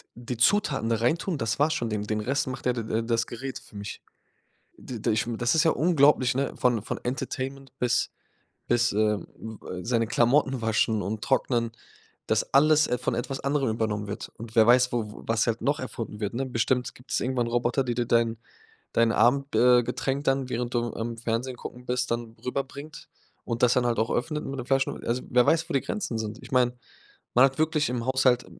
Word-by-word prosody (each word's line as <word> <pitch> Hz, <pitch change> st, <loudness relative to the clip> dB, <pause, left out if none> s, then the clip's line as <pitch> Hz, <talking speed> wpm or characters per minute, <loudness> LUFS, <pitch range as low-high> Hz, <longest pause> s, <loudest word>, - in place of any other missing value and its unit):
d 120 Hz, -, -12 dB
die -, -, -13 dB
Zutaten 135 Hz, -, +2 dB
da 115 Hz, -, +3 dB
reintun, 160 Hz, -, 0 dB
das 115 Hz, -1 st, -2 dB
war's 155 Hz, +2 st, +3 dB
schon. 115 Hz, -, -2 dB
Den 105 Hz, -1 st, -2 dB
den 105 Hz, 0 st, -2 dB
Rest 135 Hz, +5 st, 0 dB
macht 130 Hz, 0 st, -6 dB
de 125 Hz, -, +3 dB
der 115 Hz, -1 st, -2 dB
das 115 Hz, 0 st, 0 dB
Gerät 130 Hz, +2 st, -6 dB
für -, -, -18 dB
mich“. 100 Hz, 0 st, -7 dB, 0.8 s
D 120 Hz, -4 st, -7 dB
d -, -, 0 dB
ich 110 Hz, -, +1 dB
das 120 Hz, +4 st, +1 dB
ist 160 Hz, -, +4 dB
ja 160 Hz, -, +5 dB
unglaublich, 145 Hz, -6 st, +3 dB
ne, 135 Hz, 0 st, -1 dB
von 120 Hz, -4 st, +2 dB
von -, -, -4 dB
Entertainment 135 Hz, +1 st, -4 dB
bis 125 Hz, -1 st, +1 dB, 0.6 s
bis, 120 Hz, 0 st, +2 dB
ähm, 105 Hz, +1 st, -2 dB
äh, 90 Hz, 0 st, -5 dB
seine 115 Hz, -1 st, +1 dB
Klamotten 130 Hz, +2 st, +2 dB
waschen 110 Hz, -1 st, +1 dB
und 105 Hz, +3 st, -4 dB
trocknen, 120 Hz, -3 st, +1 dB, 0.6 s
dass -, -, 0 dB
alles, 155 Hz, +2 st, +5 dB
äh, 125 Hz, -, 0 dB
von 125 Hz, -1 st, -2 dB
etwas 135 Hz, +3 st, -3 dB
anderem 140 Hz, -2 st, 0 dB
übernommen 110 Hz, -2 st, -2 dB
wird. 100 Hz, -, -6 dB
Und 115 Hz, 0 st, -9 dB
wer 110 Hz, 0 st, +6 dB
weiß, 125 Hz, +1 st, +5 dB
wo 110 Hz, -3 st, -3 dB
was 115 Hz, +1 st, +1 dB
halt 115 Hz, 0 st, -1 dB
noch 145 Hz, +2 st, +1 dB
erfunden 115 Hz, -4 st, -6 dB
wird, 105 Hz, 0 st, -2 dB
ne? 135 Hz, -, -1 dB
Bestimmt 125 Hz, 0 st, 0 dB
gibt's 125 Hz, +2 st, -3 dB
irgendwann 125 Hz, -2 st, -1 dB
Roboter, 120 Hz, +3 st, +1 dB
die 120 Hz, -2 st, -2 dB
dir 120 Hz, 0 st, 0 dB
dein 115 Hz, -1 st, +2 dB, 0.6 s
dein 115 Hz, -1 st, +3 dB
Abend, 140 Hz, +3 st, +2 dB
äh, 125 Hz, 0 st, +6 dB
Getränk 135 Hz, +4 st, -2 dB
dann, 135 Hz, -1 st, +1 dB
während 120 Hz, +1 st, -3 dB
du 120 Hz, 0 st, -1 dB
am 115 Hz, +1 st, -4 dB
Fernsehen 120 Hz, +2 st, -2 dB
gucken 125 Hz, +1 st, -9 dB
bist, 125 Hz, 0 st, -1 dB
dann 115 Hz, -1 st, -3 dB
rüber 125 Hz, +2 st, 0 dB
bringt 140 Hz, +3 st, -10 dB, 0.4 s
und 115 Hz, +1 st, -2 dB
das 125 Hz, -, +6 dB
dann 125 Hz, -1 st, +2 dB
halt 115 Hz, -2 st, +1 dB
auch 110 Hz, -, +1 dB
öffnet 150 Hz, +4 st, -1 dB
mit 135 Hz, 0 st, -5 dB
dem 125 Hz, -, -5 dB
Flaschen 135 Hz, 0 st, 0 dB
also, 120 Hz, +2 st, 0 dB
wer 125 Hz, -1 st, +4 dB
weiß, 165 Hz, +1 st, +2 dB
wo -, -, -3 dB
die 135 Hz, -, +3 dB
Grenzen 125 Hz, -, -3 dB
sind? 110 Hz, 0 st, -4 dB
Ich -, -, -13 dB
meine, 125 Hz, -1 st, +3 dB, 0.6 s
man 125 Hz, +2 st, +7 dB
hat 135 Hz, -1 st, -1 dB
wirklich 155 Hz, -1 st, +2 dB
im 125 Hz, -1 st, -2 dB
Haushalt 130 Hz, -2 st, +3 dB
120 Hz, 210 wpm, -26 LUFS, 115-135 Hz, 0.8 s, man